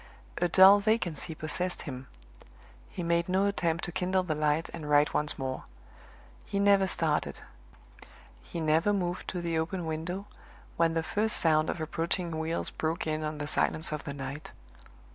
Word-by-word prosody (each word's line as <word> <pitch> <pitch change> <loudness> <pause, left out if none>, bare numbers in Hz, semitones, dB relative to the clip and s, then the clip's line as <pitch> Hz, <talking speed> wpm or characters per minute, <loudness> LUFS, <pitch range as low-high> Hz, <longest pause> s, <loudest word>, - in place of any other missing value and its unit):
A 175 - +2
dull 190 +3 +8
vacancy 180 -7 0
possessed 175 +4 -3
him; 130 -3 -7 0.8
he 180 - -5
made 170 +1 +1
no 190 +2 +2
attempt 170 -5 0
to 175 - -3
kindle 185 +1 0
the 170 -4 -1
light 150 +2 +1
and 155 -3 -6
write 145 0 +4
once 150 0 0
more. 130 -1 -4 0.8
He 200 - -4
never 200 -1 +4
started; 160 -4 0 1.0
he 115 - -7
never 160 +5 +2
moved 180 -2 -2
to 180 - -3
the 165 -1 0
open 170 +2 -3
window, 165 +5 -4 0.5
when 165 0 +2
the 165 - +1
first 210 +6 +2
sound 155 -1 +3
of - - -3
approaching 165 +1 -2
wheels 160 +1 -2
broke 160 +2 -2
in 155 0 -2
on 155 0 -3
the 145 - -4
silence 155 +1 0
of 150 -1 -4
the 140 - -4
night. 140 +2 -6
165 Hz, 165 wpm, -29 LUFS, 155-180 Hz, 1.0 s, dull